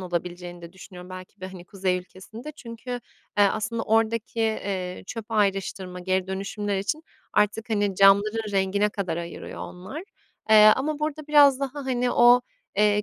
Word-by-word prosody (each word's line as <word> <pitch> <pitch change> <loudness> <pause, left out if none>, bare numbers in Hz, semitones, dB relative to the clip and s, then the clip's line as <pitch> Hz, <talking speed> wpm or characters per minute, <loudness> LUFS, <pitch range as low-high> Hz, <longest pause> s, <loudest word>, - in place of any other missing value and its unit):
olabileceğini 175 -1 -5
de 170 - -10
düşünüyorum, 185 -1 -12
belki 185 +2 -10
de, 185 - -5
hani, 185 -2 -11
kuzey 185 -1 -1
ülkesinde. 215 +10 -10
Çünkü, 235 -3 -10 0.5
eee, 205 - +7
aslında 215 +3 0
oradaki, 225 +1 0
eee, 195 -5 -2
çöp 225 -3 -6
ayrıştırma, 195 -3 -1
geri 185 +1 0
dönüşümler 200 +1 -3
için 300 +11 -2 0.3
artık, 210 +2 +1
hani, 205 -2 +1
camların 205 +3 +4
rengine 195 +1 +2
kadar 190 -5 -3
ayırıyor 170 0 -7
onlar. 190 - -7 0.5
Eee, 215 0 +9
ama 290 +3 -2
burada 305 0 -3
biraz 285 -3 +6
daha, 275 0 -3
hani 250 -1 0
o, 240 +1 +6 0.4
eee, 210 0 +3
205 Hz, 150 wpm, -25 LUFS, 185-230 Hz, 0.5 s, Eee